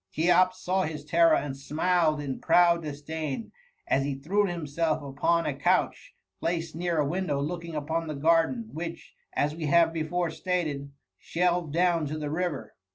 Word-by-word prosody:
Cheops 180 - +3
saw 190 +1 +1
his 150 -4 -4
terror 165 0 +5
and 140 -2 -2
smiled 155 +2 +1
in 140 -3 -4
proud 170 -1 +4
disdain 155 +4 -5 0.3
as 135 - +1
he 140 0 -2
threw 195 +10 +1
himself 160 -2 -1
upon 145 +5 +1
a 150 - 0
couch, 140 +2 0 0.2
placed 165 - -2
near 170 0 -1
a 150 - +2
window 165 -3 -1
looking 165 +2 -4
upon 160 +2 -2
the 155 - -4
garden, 140 -6 +2
which, 165 +2 -6 0.2
as 150 +1 0
we 160 -2 -3
have 165 +2 +4
before 165 +1 -1
stated, 155 -6 -2 0.3
shelved 175 -2 0
down 170 -1 +2
to 155 +2 -4
the 150 -1 -4
river. 170 -2 -3
160 Hz, 160 wpm, -27 LUFS, 145-175 Hz, 0.3 s, terror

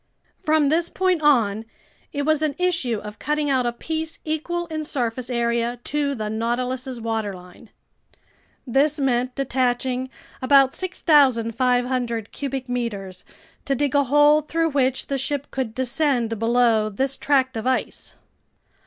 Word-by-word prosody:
From 310 -3 +3
this 335 +3 +1
point 370 -3 +1
on, 225 -8 +3 0.5
it 285 - -2
was 310 0 +2
an 305 -3 0
issue 335 -11 0
of 210 0 -9
cutting 300 -1 0
out 255 -2 +2
a - - +1
piece 320 +6 -4
equal 335 +3 -2
in 315 -2 -4
surface 250 -3 -3
area 235 0 0
to 285 -1 -1
the 215 -3 -4
Nautilus's 250 +3 -2
waterline. 210 -3 -5 1.0
This 285 +4 +2
meant 250 -2 0
detaching 255 -1 -1 0.3
about 270 0 +5
6,500 250 - +1
cubic 270 -2 -4
meters, 205 -7 -4 0.4
to 275 - 0
dig 285 0 0
a 285 -1 +3
hole 295 +3 +5
through 325 +2 0
which 265 -3 0
the 275 -1 -2
ship 285 +1 -2
could 250 -5 -3
descend 255 -4 0
below 230 -2 +3
this 265 +6 -1
tract 265 -3 +1
of 225 +2 -3
ice. 260 - -2
260 Hz, 135 wpm, -23 LUFS, 235-290 Hz, 1.0 s, about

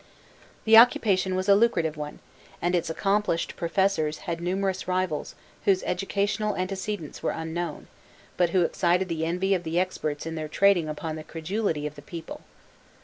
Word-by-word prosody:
The 220 0 +8
occupation 195 -5 +5
was 185 +1 -1
a 200 - +7
lucrative 200 -8 +2
one, 150 -1 -7 0.4
and 175 +1 0
its 170 -2 0
accomplished 195 0 0
professors 170 -3 0
had 170 -2 -3
numerous 190 +1 -1
rivals 185 -4 -1 0.3
whose 190 -2 +3
educational 200 +3 -1
antecedents 190 -2 -4
were - - 0
unknown, 165 +2 -4 0.5
but 175 -1 +2
who 180 0 +3
excited 180 +2 +1
the 160 -1 -1
envy 185 +3 +1
of 185 - +1
the 165 0 -1
experts 155 -5 -2
in 165 - -4
their 155 -1 -4
trading 175 -1 +3
upon 155 +1 -4
the 155 - -7
credulity 165 0 -2
of 150 - -4
the 145 - -12
people. 165 +2 -8
180 Hz, 160 wpm, -26 LUFS, 160-195 Hz, 0.5 s, The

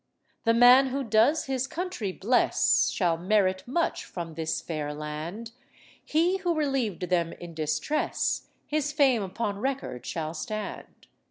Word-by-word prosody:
The 230 0 +4
man 250 +3 +7
who 270 +1 -2
does 230 +7 +3
his 265 -1 -1
country 335 - -3
bless 225 +7 +2
Shall 170 -4 +1
merit 185 +1 +2
much 330 +7 -1
from 170 -3 -7
this 160 0 -2
fair 150 -3 -4
land; 155 +9 -6 0.5
He 340 +5 +2
who 355 -3 -1
relieved 260 - -1
them 170 -2 +1
in 175 -1 -10
distress 160 - -1 0.2
His 295 -1 -1
fame 275 -6 +3
upon 200 +1 -3
record 260 - -3
shall 160 -1 -3
stand. 210 +6 -6
215 Hz, 140 wpm, -27 LUFS, 170-270 Hz, 0.5 s, man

